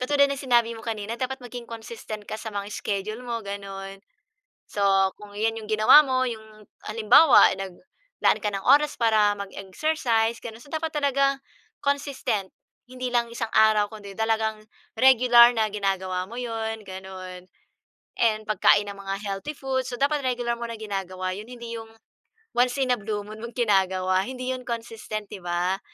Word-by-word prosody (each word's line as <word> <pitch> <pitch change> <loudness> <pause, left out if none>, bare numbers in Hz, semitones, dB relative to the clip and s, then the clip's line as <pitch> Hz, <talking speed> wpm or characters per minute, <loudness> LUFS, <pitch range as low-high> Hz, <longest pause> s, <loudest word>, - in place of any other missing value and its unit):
katulad 280 +2 +3
ng 280 - -2
sinabi 240 -3 +2
mo 225 - -11
kanina, 220 0 -4
dapat 265 +1 -3
maging 245 0 -8
consistent 220 -2 -8
ka 215 - -4
sa 220 0 -7
mga 200 0 -4
schedule 210 +3 -3
mo, 235 -1 -3
gano'n. 195 -1 -7 0.7
So, 205 - -2 0.3
kung 210 -1 -12
iyan 225 +2 -1
yung 215 - -11
ginawa 215 +8 +8
mo, 260 -2 +1
yung 220 -2 -9 0.2
halimbawa 230 +7 +6
naglaan 195 - -3
ka 210 - 0
ng 195 0 -3
oras 290 +3 +5
para 220 -3 +4
mag-exercise, 225 +3 -1
gano'n. 225 -1 -8
So, - - -16
dapat 320 0 -2
talaga 275 -1 +2 0.4
consistent, 275 -8 -1 0.4
hindi 255 0 -5
lang 235 -1 +1
isang 230 -1 -3
araw 215 -1 +5
kundi 205 -2 -9
talagang 220 -1 0 0.4
regular 245 -2 +7
na 220 -1 +2
ginagawa 190 -2 -2
mo 230 - -10
'yon, 225 -2 -4
gano'n. 185 -1 -9 0.7
And, 215 -2 +2
pagkain 205 -1 +4
ng 200 - -11
mga 195 - -1
healthy 200 +10 -4
food, 265 -1 -2
so 245 - -4
dapat 290 +1 +2
regular 245 -2 0
mo 235 - -4
na 230 - -6
ginagawa 190 -3 -4
'yon, 210 +3 -8
hindi 235 -1 -7
yung 225 0 -11 0.7
once 245 +1 +3
in 255 - +2
a 245 - +1
blue 205 0 -3
moon 215 +1 -10
mong 235 0 -8
ginagawa, 190 -5 +2
hindi 255 0 -4
'yon 255 0 -8
consistent, 225 -2 -5
'di 200 - -7
ba? 175 +2 -1
225 Hz, 165 wpm, -25 LUFS, 205-250 Hz, 0.7 s, ginawa